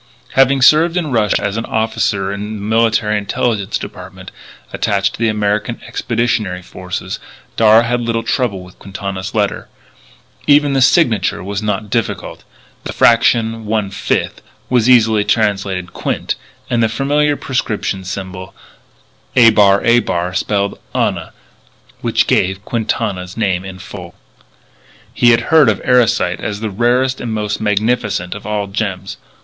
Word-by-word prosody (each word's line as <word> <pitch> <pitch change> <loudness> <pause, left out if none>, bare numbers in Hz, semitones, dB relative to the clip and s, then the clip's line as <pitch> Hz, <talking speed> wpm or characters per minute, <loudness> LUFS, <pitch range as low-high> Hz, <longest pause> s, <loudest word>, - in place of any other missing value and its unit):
Having 135 0 +3
served 165 +5 +5
in 160 -5 -1
Russia 110 -4 +1
as 100 +1 -2
an 115 - -3
officer 110 -3 -1
in 105 +2 -5
the 105 - -7
Military 110 0 +1
Intelligence 100 0 -1
Department - - -10 0.4
attached 100 -1 0
to - - -10
the 115 -1 +2
American 105 +2 -1
Expeditionary 115 -6 -1
Forces, 90 +1 -6 0.4
Darragh 110 +1 +5
had 120 +1 0
little 115 -1 -1
trouble 115 -6 -1
with 90 0 -16
Quintana's 95 +1 -6
letter. 105 -2 -1 0.8
Even 145 -1 +4
the 135 - +2
signature 120 - +2
was 100 +1 -4
not 105 -1 -3
difficult, 115 -1 -3 0.4
the - - -5
fraction 115 -1 +3
1/5 105 -2 -1 0.4
was 125 -1 +3
easily 110 -4 +5
translated 95 -5 -1
Quint; - - -2 0.3
and 120 -2 0
the 115 - +2
familiar 145 +5 +1
prescription 110 -8 -2
symbol 95 0 -7 0.8
[=a] 115 -3 +7
[=a] 100 -3 +3
spelled 100 +1 -1 0.2
ana; - - -1 0.7
which - - +1
gave 95 +2 0
Quintana's 105 -5 -3
name 95 -5 0
in 95 -1 -8
full. 90 -2 -10 1.0
He 120 - +4
had 115 0 +4
heard 155 -6 +6
of 105 - 0
Erosite 120 -2 +2
as 105 -1 -4
the 110 -1 -3
rarest 125 +5 +1
and 120 - -4
most 105 -1 -2
magnificent 105 -3 0
of 105 0 -9
all 105 -1 -1
gems. 95 -2 -4
110 Hz, 135 wpm, -16 LUFS, 100-120 Hz, 1.0 s, =a